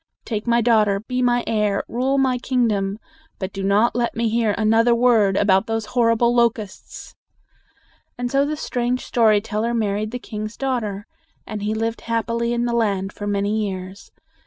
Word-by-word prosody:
Take 215 -1 -4
my 235 0 +3
daughter; 215 -4 +3
be 250 +3 -3
my 245 -1 +2
heir; 210 -3 0
rule 260 +4 0
my 260 -2 +2
kingdom. 215 -6 0 0.4
But 190 0 -5
do 195 - -5
not 200 +5 +2
let 240 -1 -1
me 230 0 0
hear 225 -2 +1
another 225 +2 +3
word 225 -5 +3
about 195 +1 +3
those 225 -1 -2
horrible 235 -1 +3
locusts!" 230 -4 -2 1.0
And 245 0 -3
so 275 0 +3
the 300 +1 -2
strange 245 -3 -2
story 220 -3 +3
teller 225 +2 -2
married 210 -1 -1
the 245 - -4
king's 215 -2 -7
daughter. 225 -7 -2 0.4
And 215 -1 -6
he 210 +1 -1
lived 225 +1 -2
happily 230 0 -1
in 240 0 0
the 240 - -1
land 200 -4 0
for 205 - -6
many 205 +2 0
years. 190 +1 -8
225 Hz, 170 wpm, -21 LUFS, 210-240 Hz, 1.0 s, my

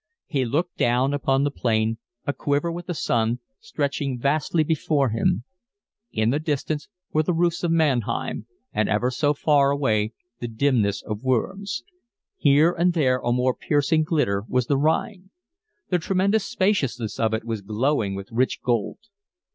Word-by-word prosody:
He 140 -6 -1
looked 155 +9 -1
down 125 +3 +2
upon 135 -1 +1
the 145 - +1
plain, 115 -3 0 0.3
a 145 - 0
quiver 145 +4 0
with 175 +1 -6
the 175 - -3
sun, 115 -4 +1 0.2
stretching 140 - -2
vastly 150 +5 +1
before 150 -3 +1
him: 110 -1 +1 0.7
in 110 +1 +1
the 145 - +1
distance 150 -1 -2 0.3
were 155 - +4
the 165 +2 0
roofs 170 +1 +1
of 175 - +1
Mannheim 140 -8 0 0.3
and 110 0 +1
ever 115 +5 +1
so 145 +3 +1
far 140 -1 +3
away 110 -6 +1 0.3
the 120 - -3
dimness 115 -4 +1
of 105 0 -5
Worms. 180 - -1 0.5
Here 145 +4 +4
and 175 +1 +1
there 130 -6 +2
a 120 - -1
more 125 +1 +2
piercing 150 +3 +1
glitter 145 - 0
was 125 -1 +1
the 140 +2 +1
Rhine. 180 +5 0 0.6
The 180 - +2
tremendous 195 +5 +1
spaciousness 135 - 0
of 110 -1 +2
it 110 - -4
was 115 -2 -3
glowing 110 0 0
with 100 +2 -8
rich 125 +3 0
gold. 120 -5 0
140 Hz, 160 wpm, -24 LUFS, 115-155 Hz, 0.7 s, were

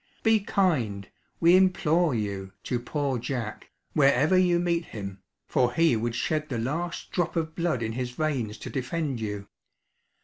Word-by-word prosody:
Be 225 -1 +5
kind, 130 - 0 0.3
we 170 +2 +6
implore 175 -5 +3
you, 100 -3 -3
to 125 - -1
Poor 135 0 -2
Jack, 115 -3 -4 0.2
wherever 145 +3 +4
you 180 -1 +4
meet 170 -1 0
him, 100 -3 -7 0.2
for 125 -1 +1
he 165 -5 +4
would 115 +1 -1
shed 155 +3 -1
the 125 - -2
last 160 +9 -3
drop 175 -1 -1
of 160 -1 -1
blood 165 -9 0
in 110 - -2
his 125 +1 -3
veins 125 -6 -2
to - - -7
defend 135 0 -2
you! 105 -2 -4
140 Hz, 160 wpm, -27 LUFS, 115-170 Hz, 0.3 s, we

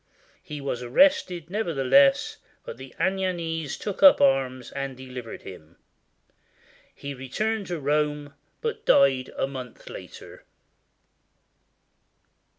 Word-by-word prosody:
He 150 -1 -8
was 135 -3 -3
arrested 175 - +2
nevertheless, 140 -9 +3 0.3
but - - -8
the 130 +1 -12
Anagnese 170 -4 -1
took 205 - -5
up 285 -1 +8
arms 130 -2 +1
and 140 -2 -5
delivered 125 -3 -8
him. 85 -3 -12 1.2
He 140 0 -6
returned 200 - -3
to 175 -2 -3
Rome, 150 0 -1 0.3
but 460 -1 -3
died 135 -2 +4
a - - +1
month 130 -3 -9
later. - - -11
140 Hz, 105 wpm, -25 LUFS, 130-175 Hz, 1.2 s, up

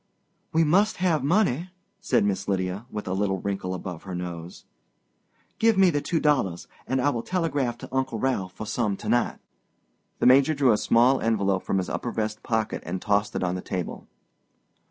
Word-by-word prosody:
"We 165 +1 +3
must 195 +8 +3
have 170 -6 +1
money," 175 - +1 0.3
said 120 -5 +2
Miss 100 -2 -1
Lydia, 95 +3 -2
with 105 -4 -6
a 95 - -1
little 95 0 0
wrinkle 95 -2 -3
above 90 -2 -6
her 95 -2 -6
nose. 85 -1 -7 0.9
"Give 225 -2 +4
me 190 -2 +6
the 145 -2 0
two 165 +3 0
dollars, 130 - +1 0.2
and 130 - 0
I 145 +3 +2
will 115 - -2
telegraph 145 -8 -1
to 130 - -9
Uncle 130 -3 0
Ralph 105 -7 -1
for 110 - -7
some 110 -2 -1
to - - -8
night." 120 - +1 0.8
The - - -1
Major 135 +4 +6
drew 135 -3 +4
a 105 - +3
small 125 +3 +4
envelope 100 -4 +1
from 95 - -1
his 95 - -1
upper 120 - -3
vest 110 -1 -3
pocket 110 -2 -1
and 90 +2 -4
tossed 105 +2 0
it - - -1
on 90 -1 0
the 90 - -4
table. 90 -2 -5
115 Hz, 190 wpm, -25 LUFS, 95-145 Hz, 0.9 s, me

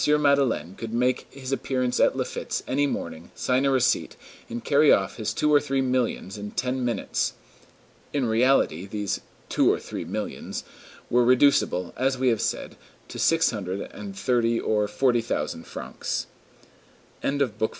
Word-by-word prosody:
Madeleine 140 - +2
could 115 +3 -6
make 125 +1 +1
his 135 -1 -7
appearance 130 -2 0
at - - +4
Laffitte's - - -3
any 145 +2 +2
morning, 85 - -5
sign 130 +2 +1
a - - +4
receipt, 130 -10 +2 0.3
and 120 - -5
carry 145 +1 +5
off 95 -1 +2
his 110 -2 -2
two 150 +6 +1
or 145 - +7
three 135 -2 -1
millions 125 -6 -1
in 105 0 -5
ten 130 +3 -2
minutes. 120 -4 -1 0.8
In 140 -3 0
reality, 110 - +2
"these 105 -1 -2 0.3
two - - +3
or - - 0
three - - -6
millions" - - -5 0.5
were 125 +1 +5
reducible, 125 -8 +3
as 130 +1 +1
we 130 0 +2
have 115 -3 +1
said, - - -3 0.3
to - - -7
six 165 0 +3
hundred 100 -3 -4
and 195 -1 -8
thirty 120 -8 +2
or 105 -1 +1
forty 120 +3 +2
thousand 80 -7 -3
francs. - - -4 1.0
CHAPTER 140 0 +1
IV—M. 110 -3 -1
125 Hz, 160 wpm, -25 LUFS, 105-135 Hz, 1.0 s, or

